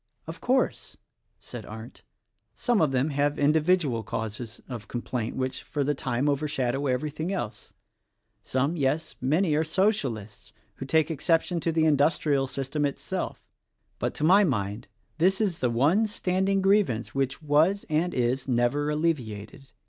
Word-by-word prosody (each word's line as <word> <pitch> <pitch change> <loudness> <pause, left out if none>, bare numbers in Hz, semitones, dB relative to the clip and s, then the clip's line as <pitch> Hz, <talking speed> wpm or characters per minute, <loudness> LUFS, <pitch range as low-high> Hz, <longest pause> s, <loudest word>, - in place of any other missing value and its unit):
"Of - - -8
course," 260 +1 0 0.4
said - - -8
Arndt, - - -10 0.5
"some 240 -6 +1
of 155 -4 +3
them 135 +4 +1
have 145 +1 +1
indi 150 +2 +4
vidual 150 -9 +1
causes 110 +2 -5
of 120 -5 -7
complaint, 120 -1 -3
which, 130 0 -2
for 145 -2 -2
the 145 +2 +1
time, 130 0 -1
over 145 +1 +1
shadow 135 0 -1
everything 150 +6 -2
else. 120 - -5 0.7
Some, 140 +6 0
yes, 145 +1 -1
many, 155 +6 +2
are 155 +2 +2
Socialists 150 - -1 0.2
who 135 - -6
take 160 +2 +2
exception 165 +3 +1
to 165 - 0
the 160 0 +2
industrial 145 -2 +2
system 135 +3 -3
itself. 140 -1 -3 0.5
But - - -2
to - - -3
my 190 +6 +6
mind 105 - -1 0.3
this 190 +3 +3
is 195 -6 0
the 125 - +1
one 150 - +3
standing 190 -1 0
grievance 195 - +2
which 135 -1 -1
was 155 +7 +3
and 160 +3 +1
is 125 0 0
never 130 +4 +1
alleviated. 135 -6 -3
145 Hz, 150 wpm, -27 LUFS, 130-165 Hz, 0.7 s, my